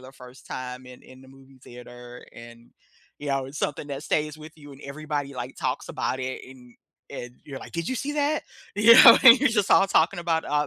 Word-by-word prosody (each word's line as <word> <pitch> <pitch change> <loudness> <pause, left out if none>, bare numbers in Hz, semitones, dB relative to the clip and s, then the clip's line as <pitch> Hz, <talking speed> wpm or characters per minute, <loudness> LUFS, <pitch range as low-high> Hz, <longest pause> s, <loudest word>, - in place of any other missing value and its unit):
the 130 +1 -14
first 125 0 -16
time 125 0 -8
in 125 0 -14
in 130 0 -17
the 130 - -18
movie 135 0 -19
theater. 120 0 -13
And, 115 0 -15 0.5
you 145 - -7
know, 135 -1 -2
it's 145 +3 -10
something 145 +1 -4
that 140 0 -6
stays 150 0 -2
with 155 +1 -12
you 145 -2 -14
and 140 - -15
everybody, 145 -1 -6
like, 125 +1 -8
talks - - -4
about 130 - -4
it. 130 0 -5
And 125 -2 -17 0.4
and 120 0 -9
you're 135 -2 -9
like, - - -12
"Did 170 -1 -4
you - - -2
see 290 +3 -4
that?" 295 +1 -1 0.3
You 215 +3 +6
know? 230 - +9
And 255 +1 +9
you're 285 - +3
just 205 -4 -1
all 195 - +5
talking 175 +2 +1
about, 165 -1 -2
uh, 150 0 -1
140 Hz, 225 wpm, -24 LUFS, 130-160 Hz, 0.5 s, know